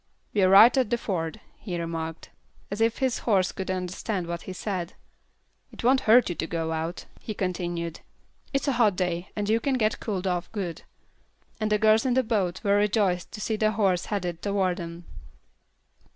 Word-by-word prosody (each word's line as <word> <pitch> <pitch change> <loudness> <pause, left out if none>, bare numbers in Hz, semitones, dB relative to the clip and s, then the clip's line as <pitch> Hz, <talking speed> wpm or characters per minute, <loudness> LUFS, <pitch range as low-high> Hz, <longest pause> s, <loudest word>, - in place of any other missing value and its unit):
"We're 190 -3 +4
right 220 +7 +8
at 250 -5 +1
the 240 - +1
ford," 175 -4 -3 0.2
he 175 -5 -4
remarked, 165 -1 -5 0.4
as 205 +2 -3
if 225 0 +2
his 260 -3 0
horse 190 -5 +2
could 190 - -6
understand 185 +1 -2
what 170 0 -4
he - - -7
said. 185 -2 -4 0.8
"It - - -10
won't 260 +3 +5
hurt 240 +3 +7
you 175 - -1
to 160 - -4
go 165 -1 -2
out," 160 +2 -3
he 215 - -6
continued. 175 -3 -3 0.5
"It's 275 +1 -1
a - - +3
hot 230 -6 +3
day, 180 -1 -2
and 205 -1 -2
you 220 +2 +3
can 275 +2 0
get 215 -2 +1
cooled 195 -4 -3
off 180 -1 -1
good." 180 -6 -4 0.8
And 215 -1 -1
the 210 - +4
girls 215 +1 +4
in 255 -2 +1
the 260 - +3
boat 200 -6 -1
were 200 -1 +3
rejoiced 200 -4 +1
to 210 - -6
see 220 0 -1
the 215 0 +2
horse 195 -4 +1
headed 180 -5 -3
toward 195 -3 0
them. 170 -1 -7
195 Hz, 190 wpm, -26 LUFS, 175-220 Hz, 0.8 s, right